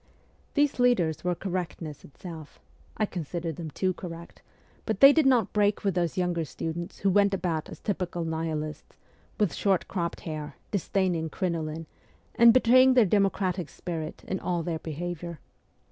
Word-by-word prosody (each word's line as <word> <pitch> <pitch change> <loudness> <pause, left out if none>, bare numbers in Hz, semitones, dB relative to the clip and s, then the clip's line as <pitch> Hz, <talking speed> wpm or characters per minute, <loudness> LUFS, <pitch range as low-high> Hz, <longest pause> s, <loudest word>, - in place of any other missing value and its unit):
These 290 -3 +2
leaders 190 -11 +2
were 180 0 0
correctness 175 -5 -4
itself 160 0 -10 0.4
I 215 - +2
considered 170 -3 -4
them 165 -2 -5
too 185 +5 0
correct 170 -2 -9 0.5
but - - -1
they 275 +1 +10
did 310 -3 +4
not 250 -4 +4
ST. - - -37
PETERSBURG 205 -1 +3
46 - - -35
break - - -13
with 195 - +2
those 175 -1 -1
younger 175 -2 0
students 165 +3 -5
who 195 - +3
went 200 0 +4
about 165 -4 -2
as - - -10
typical 180 -4 -2
Nihilists, 160 -1 -4 0.4
with 205 -7 +2
short 195 -3 +1
cropped 170 -3 -3
hair, 150 -3 -6 0.2
disdaining 185 -4 0
crinoline, 165 -2 -3 0.5
and 235 0 +7
betraying 255 +2 +6
their 245 -4 +6
democratic 190 -3 +1
spirit 160 -3 -6
in 190 - -2
all 175 -2 -1
their 165 -1 -2
behaviour. 170 +1 -5
175 Hz, 160 wpm, -27 LUFS, 160-200 Hz, 0.5 s, they